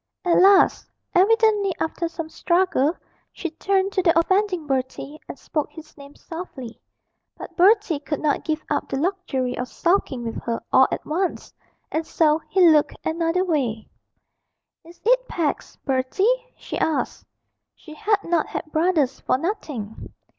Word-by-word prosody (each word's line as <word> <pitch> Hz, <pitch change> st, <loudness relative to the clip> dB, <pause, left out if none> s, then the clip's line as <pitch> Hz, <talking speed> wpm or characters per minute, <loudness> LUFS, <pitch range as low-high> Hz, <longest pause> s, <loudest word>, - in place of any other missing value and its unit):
At 350 Hz, 0 st, +4 dB
last, 390 Hz, +1 st, +5 dB, 0.2 s
evidently 415 Hz, 0 st, +3 dB
after 335 Hz, +1 st, -2 dB
some 330 Hz, -1 st, -6 dB
struggle, 345 Hz, -3 st, +1 dB, 0.4 s
she 340 Hz, -, -5 dB
turned 385 Hz, +4 st, 0 dB
to 385 Hz, -, +1 dB
the 335 Hz, -2 st, +3 dB
offending 375 Hz, -1 st, +1 dB
Bertie, 270 Hz, +2 st, -3 dB
and -, -, -7 dB
spoke 300 Hz, +2 st, -3 dB
his 320 Hz, -1 st, -13 dB
name 280 Hz, 0 st, -14 dB
softly; 305 Hz, -9 st, -9 dB, 0.6 s
but -, -, -10 dB
Bertie 385 Hz, -4 st, +4 dB
could 295 Hz, +1 st, -4 dB
not 300 Hz, -2 st, 0 dB
give 310 Hz, -1 st, -2 dB
up 290 Hz, -, -1 dB
the -, -, -2 dB
luxury 280 Hz, -7 st, -1 dB
of 250 Hz, -, -4 dB
sulking 335 Hz, -7 st, 0 dB
with 230 Hz, -, -4 dB
her 230 Hz, -1 st, -2 dB
all 260 Hz, 0 st, +7 dB
at -, -, -4 dB
once, 355 Hz, +4 st, -2 dB, 0.4 s
and 315 Hz, -, -1 dB
so 310 Hz, -1 st, +2 dB
he 370 Hz, -2 st, +5 dB
looked 305 Hz, -2 st, +4 dB
another 330 Hz, +3 st, 0 dB
way. 255 Hz, -, -1 dB, 1.0 s
'Is 335 Hz, +1 st, -16 dB
it -, -, +3 dB
Pax, 320 Hz, -4 st, -2 dB
Bertie?' 385 Hz, -, +1 dB
she -, -, -6 dB
asked. 315 Hz, -, -1 dB, 0.5 s
(She 310 Hz, -, -13 dB
had 415 Hz, +4 st, 0 dB
not 335 Hz, -2 st, 0 dB
had 310 Hz, -, -6 dB
brothers 315 Hz, -5 st, +1 dB
for -, -, +1 dB
nothing.) 280 Hz, -, -5 dB
330 Hz, 150 wpm, -23 LUFS, 290-375 Hz, 1.0 s, all